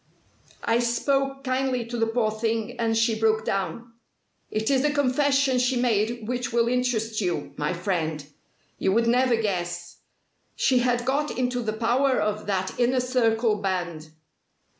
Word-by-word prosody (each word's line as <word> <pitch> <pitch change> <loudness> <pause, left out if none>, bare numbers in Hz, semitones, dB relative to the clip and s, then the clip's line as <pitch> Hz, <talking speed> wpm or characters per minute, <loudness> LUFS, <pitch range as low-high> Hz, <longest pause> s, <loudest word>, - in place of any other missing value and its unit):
I 230 +1 +2
spoke 270 +3 0
kindly 255 -2 0
to 235 +1 -6
the 225 -1 +1
poor 225 -1 +1
thing, 220 0 -2
and 225 -1 +1
she 225 0 +3
broke 220 0 +2
down. 195 +5 -3 0.6
It 215 +4 -1
is 265 -1 +3
the 300 - +2
confession 280 -1 +2
she 250 +1 +1
made 230 -1 0
which 245 0 -2
will 235 0 +2
interest 235 -3 0
you, 180 -3 -2
my 150 +4 -1
friend. 165 -5 -2 0.5
You 190 - +1
would 230 +2 +3
never 245 +1 +3
guess! 175 -5 -3 0.6
She 255 -2 +3
had 245 -1 +1
got 290 +3 -1
into 250 -1 0
the 220 -2 -2
power 245 +4 +2
of 210 0 -2
that 190 0 -2
Inner 250 +1 +3
Circle 230 -3 +1
band." 175 -5 -3
230 Hz, 155 wpm, -25 LUFS, 215-250 Hz, 0.6 s, she